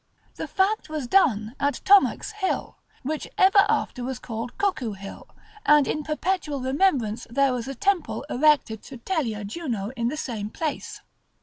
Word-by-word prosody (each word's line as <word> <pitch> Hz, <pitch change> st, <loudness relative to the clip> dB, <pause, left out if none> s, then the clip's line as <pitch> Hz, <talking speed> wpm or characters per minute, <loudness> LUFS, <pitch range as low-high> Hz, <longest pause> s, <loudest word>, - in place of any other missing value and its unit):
This -, -, -6 dB
fact 395 Hz, -1 st, +1 dB
was 305 Hz, -4 st, -3 dB
done 240 Hz, -, +2 dB
at 285 Hz, 0 st, +1 dB
Thornax 405 Hz, +2 st, +5 dB
hill, 420 Hz, -3 st, -3 dB, 0.2 s
which 305 Hz, +3 st, -3 dB
ever 390 Hz, +1 st, +6 dB
after 250 Hz, -, 0 dB
was 260 Hz, 0 st, -3 dB
called 230 Hz, -1 st, -6 dB
Cuckoo 270 Hz, -, 0 dB
hill, 195 Hz, 0 st, -10 dB, 0.4 s
and 295 Hz, -2 st, +5 dB
in 305 Hz, -, -1 dB
perpetual 305 Hz, -1 st, -2 dB
remembrance 260 Hz, -, +1 dB
there 275 Hz, +2 st, +2 dB
was 245 Hz, 0 st, -3 dB
a 275 Hz, -, -5 dB
temple 385 Hz, +2 st, 0 dB
erected 285 Hz, -6 st, +2 dB
to 265 Hz, -, -9 dB
Telia 235 Hz, -, -2 dB
Juno 225 Hz, -4 st, -4 dB
in 235 Hz, -1 st, -1 dB
the 290 Hz, +5 st, -2 dB
same 220 Hz, -8 st, -4 dB
place. 305 Hz, +5 st, -4 dB
275 Hz, 160 wpm, -25 LUFS, 235-330 Hz, 0.4 s, ever